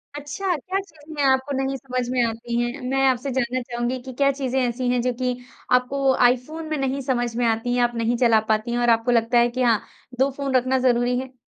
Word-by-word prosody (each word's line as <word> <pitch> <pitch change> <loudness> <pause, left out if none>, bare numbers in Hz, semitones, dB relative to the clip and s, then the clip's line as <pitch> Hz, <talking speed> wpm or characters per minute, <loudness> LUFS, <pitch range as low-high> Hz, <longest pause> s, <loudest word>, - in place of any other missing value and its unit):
अच्छा 295 +6 -2
क्या 375 +8 -3
चीज़े 310 -5 -8
आपको 265 +2 +1
नहीं 270 0 -1
समझ 255 -1 -3
में 250 -1 +1
आती 235 +1 -3
हैं? 240 +3 -3
मैं 270 0 +2
आपसे 260 +1 0
जानना 255 +1 0
चाहूँगी 240 +1 -3
कि 260 0 -9
क्या 275 0 +5
चीज़ें 265 -1 -2
ऐसी 245 0 -1
हैं 245 -1 +1
जो - - +2
की 250 0 +1 0.4
आपको 270 +1 0
आईफोन 305 +6 -2
में 310 - -1
नहीं 270 0 -1
समझ 240 -3 0
में 245 - +1
आती 225 +2 0
हैं 245 - +3
आप 240 0 0
नहीं 230 +1 0
चला 230 -2 +5
पाती 215 +2 0
हैं 240 - 0
और 240 - +2
आपको 230 +1 +3
लगता 235 0 +2
है 240 0 +4
कि 255 +2 -4
हाँ, 230 -3 +3 0.4
2 270 +1 +4
फ़ोन 275 -2 -2
रखना 255 +1 +2
ज़रूरी 245 +1 +1
है? 260 0 -8
250 Hz, 230 wpm, -23 LUFS, 240-270 Hz, 0.4 s, क्या